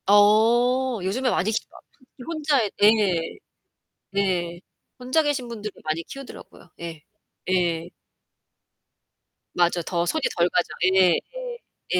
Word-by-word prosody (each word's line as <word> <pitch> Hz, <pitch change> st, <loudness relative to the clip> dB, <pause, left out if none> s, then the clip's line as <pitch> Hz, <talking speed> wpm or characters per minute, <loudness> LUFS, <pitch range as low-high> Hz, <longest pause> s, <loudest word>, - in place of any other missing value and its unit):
어. 230 Hz, +5 st, +4 dB
요즘에 245 Hz, +8 st, 0 dB
많이 215 Hz, -2 st, +1 dB
키우시더라고. 220 Hz, -, -5 dB
특히 255 Hz, -1 st, -16 dB
혼자 295 Hz, -7 st, 0 dB
예. 210 Hz, +1 st, +8 dB, 1.2 s
네. 180 Hz, -3 st, -1 dB, 0.4 s
혼자 255 Hz, +6 st, +1 dB
계신 285 Hz, -5 st, -1 dB
분들이 215 Hz, -3 st, -6 dB
많이 155 Hz, +1 st, -1 dB
키우더라고요. 270 Hz, -8 st, -11 dB
예. 165 Hz, -2 st, -7 dB, 0.5 s
예. 170 Hz, -2 st, +1 dB, 1.7 s
맞아. 175 Hz, 0 st, +2 dB
더 170 Hz, +1 st, -1 dB
손이 315 Hz, -, -1 dB, 0.2 s
덜 170 Hz, 0 st, +4 dB
가죠. 175 Hz, -, 0 dB, 0.3 s
예. 185 Hz, -3 st, +5 dB, 0.8 s
예. -, -, +4 dB
205 Hz, 225 characters per minute, -24 LUFS, 175-250 Hz, 1.7 s, 예